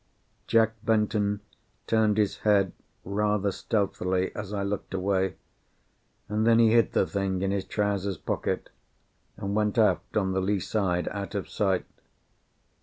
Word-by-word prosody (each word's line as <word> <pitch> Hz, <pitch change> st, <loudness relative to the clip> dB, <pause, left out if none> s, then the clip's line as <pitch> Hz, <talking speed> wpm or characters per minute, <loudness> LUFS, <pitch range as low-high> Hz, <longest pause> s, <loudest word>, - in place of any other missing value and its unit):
Jack 115 Hz, -1 st, +4 dB
Benton 105 Hz, -2 st, +1 dB, 0.4 s
turned 110 Hz, -2 st, +2 dB
his 105 Hz, -2 st, +1 dB
head 100 Hz, -3 st, +3 dB, 0.3 s
rather 105 Hz, 0 st, +1 dB
stealthily 95 Hz, -3 st, -1 dB
as 105 Hz, -2 st, -5 dB
I 100 Hz, -1 st, -2 dB
looked 100 Hz, -1 st, -3 dB
away, 95 Hz, 0 st, 0 dB, 0.9 s
and 105 Hz, +1 st, 0 dB
then 115 Hz, -1 st, +6 dB
he 115 Hz, -1 st, +5 dB
hid 115 Hz, 0 st, +3 dB
the -, -, +3 dB
thing 95 Hz, -1 st, -1 dB
in 95 Hz, -, +1 dB
his 100 Hz, -1 st, -1 dB
trousers 100 Hz, -2 st, -1 dB
pocket, -, -, -3 dB, 0.7 s
and 100 Hz, 0 st, -3 dB
went 105 Hz, +1 st, +1 dB
aft 110 Hz, -1 st, +2 dB
on 95 Hz, -2 st, +1 dB
the 95 Hz, 0 st, 0 dB
lee 100 Hz, +1 st, +1 dB
side, 90 Hz, -4 st, -1 dB
out 100 Hz, +1 st, -5 dB
of 100 Hz, -, -2 dB
sight. 95 Hz, -3 st, 0 dB
100 Hz, 145 wpm, -27 LUFS, 95-105 Hz, 0.9 s, then